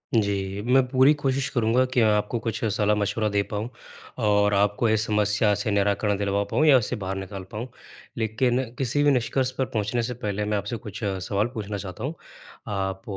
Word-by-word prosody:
जी, 100 -2 0
मैं 125 +4 +4
पूरी 130 +3 +5
कोशिश 135 -1 -1
करूँगा 120 +1 +2
कि 125 - +3
आपको 105 +1 +2
कुछ 115 -1 -2
सलाह-मशविरा 105 +1 +1
दे 100 0 +1
पाऊँ, 105 +3 -3 0.5
और 105 -2 +3
आपको 105 +3 +2
इस 110 0 +2
समस्या 105 0 +2
से 105 +1 -2
निराकरण 100 0 +1
दिलवा 100 0 0
पाऊँ 150 +10 +1
या 140 -4 +7
उससे 125 +1 -1
बाहर 95 +1 -3
निकाल 95 0 -6
पाऊँ, 115 +4 -5 0.5
लेकिन 120 +3 +1
किसी 135 +2 0
भी 145 - +5
निष्कर्ष 130 0 0
पर 130 - +1
पहुँचने 110 +2 -1
से 125 +2 -3
पहले 105 -2 -2
मैं 105 0 0
आपसे 105 +4 -3
कुछ 105 +1 -8
सवाल 100 +2 -1
पूछना 105 -2 -4
चाहता 95 +2 -7
हूँ, 145 +5 -2 0.5
आप 95 -2 -3
105 Hz, 180 wpm, -25 LUFS, 100-120 Hz, 0.5 s, या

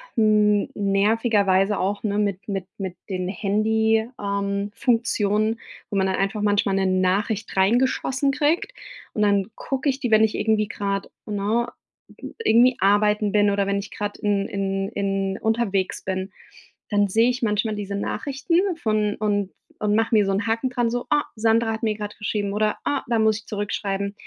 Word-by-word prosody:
n 210 -2 +3
nervigerweise 200 -1 +2
auch, 200 +2 -1
ne, 205 -2 -1
mit 200 -2 -1
mit 195 -3 -3
mit 190 -3 -5
den 185 -2 -2
Handy 220 +3 +1
ähm, 200 0 -2
Funktionen, 225 -2 +1 0.3
wo 205 - -2
man 190 0 +2
dann 190 - 0
einfach 195 +2 -1
manchmal 205 -1 +2
'ne 195 0 +1
Nachricht 190 +3 0
reingeschossen 260 +6 +2
kriegt. 305 - 0 0.4
Und, 215 - -2
dann 200 -1 +2
gucke 270 +1 -2
ich 270 0 -1
die, 245 - -2
wenn 215 0 +6
ich 220 - +1
irgendwie 215 -1 +1
grad 200 -1 -3 0.2
ne, 215 +3 0 0.8
irgendwie 245 - +5
arbeiten 205 +1 +3
bin, 205 -1 +4
oder 200 0 0
wenn 200 0 0
ich 200 - -8
gerade 205 0 -5
in 205 -1 +1
in 195 0 -2
in 195 -1 -2
unterwegs 220 -4 0
bin, 190 0 -3 0.6
dann 205 -1 +2
sehe 225 +5 +3
ich 250 +1 -2
manchmal 215 0 0
diese 200 -1 -4
Nachrichten 335 - -1
von 215 -5 0
und 205 -2 -1 0.3
und 210 -1 +1
mache 225 +1 +2
mir 210 -2 +4
so 195 - 0
'n 200 +4 -1
Haken 230 +3 0
dran, 245 -2 0
so, 245 +1 -3
„Oh, 295 - +4
Sandra 225 +1 +2
hat 220 - -6
mir 220 -1 +2
gerade 210 0 -6
geschrieben.“, 205 -1 -2
oder 210 0 0
„Ah, 285 - 0
da 235 - +2
muss 220 -1 +3
ich 210 - -18
zurückschreiben.“ 200 -1 -3
210 Hz, 175 wpm, -23 LUFS, 200-225 Hz, 0.8 s, wenn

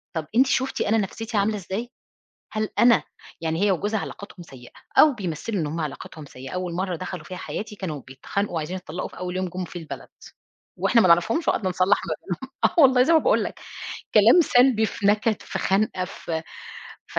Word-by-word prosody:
طب 160 -2 -2
أنتِ 260 +3 +5
شُفتِ 265 0 0
أنا 220 +2 +2
نفسيَّتي 225 +2 -3
عاملة 205 +2 +2
إزاي؟ 200 +5 -5 0.6
هل 215 0 -1
أنا 235 -1 +6 0.4
يعني 160 +1 -1
هي 205 - +4
وجوزها، 205 +4 0
علاقتهم 195 -2 -8
سيِّئة، 130 -6 -14 0.3
أو 305 -2 +7
بيمثِّلوا 195 - -3
إن 155 - -1
هُم 160 +3 -4
علاقتهم 155 0 -6
سيِّئة. 130 -1 -10
أوَّل 180 -1 -3
مرَّة 185 +1 -2
دخَلوا 180 +2 -6
في 185 - -8
حياتي، 210 +3 -6
كانوا 160 -8 -5
بيتخانِقوا 145 +10 -4
وعايزين 165 +3 -3
يتطلِّقوا 180 -1 -6
في - - -14
أوَّل 180 0 -4
يوم 185 0 -1
جُم 180 +1 -5
في 175 - -8
البلد، 160 - -8 0.7
وإحنا 230 - +4
ما 185 - +4
نعرفهمش، 175 - +3
وقعدنا 190 -4 +1
نصلّح 185 +2 +3
ما - - 0
بينهم. 230 +9 -6
آه 335 - +3
والله، 255 -2 +6
زي 325 +6 +3
ما 320 - +7
باقول - - +2
لَك، - - -6 0.5
كلام 225 - +7
سلبي، 245 -6 +4
في 200 -1 -2
نكَد، 210 +1 +2
في - - -5
خنقة، 195 -1 +1
في 165 -2 -5 0.6
ف - - -3
195 Hz, 195 wpm, -24 LUFS, 170-225 Hz, 0.7 s, أو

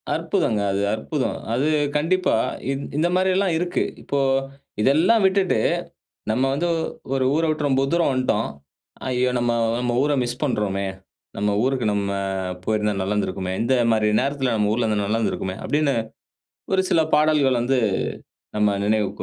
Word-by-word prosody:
அற்புதங்க. 105 -2 0
அது 100 +1 -1
அற்புதம். 130 +5 -2 0.2
அது 130 +5 +1 0.3
கண்டிப்பா 185 +5 +1 0.4
இந் 135 +1 -3
இந்த 160 +3 +2
மாரி 185 +1 +2
எல்லாம் 190 -2 +1
இருக்கு. 175 +1 0 0.2
இப்போ, 140 - -2 0.6
இதெல்லாம் 165 - +4
விட்டுட்டு 190 -1 +2 0.7
நம்ம 120 +4 +1
வந்து 160 +5 0 0.5
ஒரு 135 -1 +1
ஊரை 165 +1 +2
விட்டு 155 -1 0
ரொம்ப 135 -1 +2
தூரம் 170 -4 +2
வந்துடோம். 125 -4 0 0.6
"ஐயோ! 125 0 +1
நம்ம, 120 0 +1 0.3
நம்ம 125 -1 -1
ஊர 145 - +1
மிஸ் 120 0 -5
பண்றோமே. 105 -7 -1 0.5
நம்ம 105 +1 +1
ஊருக்கு 130 -2 0
நம்ம 100 -1 -1 0.5
போயிருந்தா 105 0 0
நல்லா 95 +2 -1
இருந்திருக்குமே. 95 -2 -2
இந்த 120 +3 +1 0.2
மாரி 110 -1 +2
நேரத்துல 135 -2 -1
நம்ம 105 -1 +1
ஊர்ல 115 +1 0
இருந்தா 105 -1 0
நல்லா 110 +2 0
இருந்திருக்குமே!" 95 -4 -2
அப்படின்னு 150 -1 +1 0.8
ஒரு 190 - +4
சில 165 - +4
பாடல்கள் 150 -5 +3
வந்து 130 +2 +1 0.8
நம்ம 105 0 +3
நினைவுக்கு 105 -1 0
130 Hz, 150 wpm, -22 LUFS, 105-150 Hz, 0.8 s, இதெல்லாம்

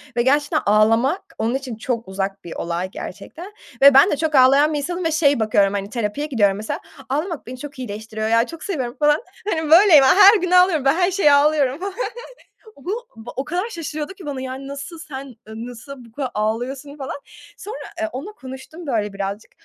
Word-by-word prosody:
ve 240 - +2
gerçekten 290 +4 +2
ağlamak 225 - +3 0.2
onun 230 +3 -1
için 265 -3 -5
çok 230 +1 -3
uzak 195 +1 -4
bir 170 - -8
olay 170 +2 -3
gerçekten 360 - -9 0.3
ve 280 0 +9
ben 275 +9 +6
de - - 0
çok 310 0 -1
ağlayan 275 +4 +5
bir - - -1
insanım 345 +5 -3
ve, 325 - +1
şey, 290 -4 +3
bakıyorum, 205 -2 +2
hani, 200 0 -3
terapiye 235 +5 -3
gidiyorum 205 -8 +2
mesela, 215 +1 -4 0.3
ağlamak 305 +2 -3
beni 255 +1 -7
çok 290 +1 -9
iyileştiriyor 220 -2 -5
ya, 230 +1 +3
çok 330 +3 -10
seviyorum, 260 -10 -3
falan. 295 0 +3 0.3
Hani, 320 -5 -1
böyleyim, 335 -4 +8
her 400 - +7
gün 365 -1 -2
ağlıyorum, 360 -5 +4
ben 275 - +5
her 360 +1 +2
şeye 355 -6 +4
ağlıyorum 285 -1 +3
falan. 390 +1 -4 0.8
O 280 - -19
bu 445 +7 -3 0.3
o 265 - -2
kadar 360 +8 -2
şaşırıyordu 310 -3 -5
ki 380 -3 -13
bana, 280 -3 -4
yani, 260 +1 -6
nasıl, 280 +4 -8
sen 275 -3 -8 0.2
ı 220 +1 -7
nasıl 245 +2 -10
bu 230 - -18
kadar 260 +2 -4
ağlıyorsun 245 +7 -3
falan. 270 -2 -5 0.4
Sonra, 430 +5 -7 0.2
eee, 330 0 -1
onunla 275 +12 -6
konuştum, 265 +1 -10
böyle, 210 -6 -1
birazcık. 200 +2 -5
275 Hz, 195 wpm, -21 LUFS, 230-320 Hz, 0.8 s, ve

